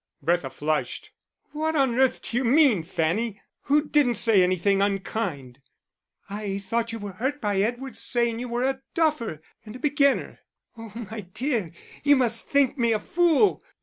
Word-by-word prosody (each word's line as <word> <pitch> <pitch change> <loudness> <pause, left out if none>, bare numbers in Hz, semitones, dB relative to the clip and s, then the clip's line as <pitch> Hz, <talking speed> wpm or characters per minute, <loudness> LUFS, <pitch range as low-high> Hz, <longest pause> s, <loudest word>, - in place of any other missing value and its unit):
Bertha 170 -5 0
flushed. 150 +2 -3 0.4
"What 315 +1 -2
on 270 -4 +2
earth 265 -1 +2
do - - -5
you 265 - +1
mean, 260 - +4
Fanny? 185 +6 -2 0.3
Who 295 +2 +2
didn't 280 -6 +2
say 215 -2 +4
anything 185 +2 +2
unkind?" 195 - -3 0.7
"I 200 -1 -4
thought 230 +3 -2
you 230 - -4
were 205 -2 -6
hurt 265 +10 -3
by 205 -4 -1
Edward's 240 +2 -3
saying 235 -1 +1
you 245 0 -5
were 240 +1 -1
a 265 0 -1
duffer 270 - 0 0.2
and 215 +1 -10
a - - -9
beginner." 280 0 +1 0.4
"Oh, 225 -1 -10 0.2
my 220 -1 -5
dear, 235 - -1 0.3
you 285 0 +5
must 235 -4 +1
think 280 -1 +2
me 235 -1 +3
a 215 - 0
fool." 345 - +2
230 Hz, 165 wpm, -25 LUFS, 200-270 Hz, 0.7 s, you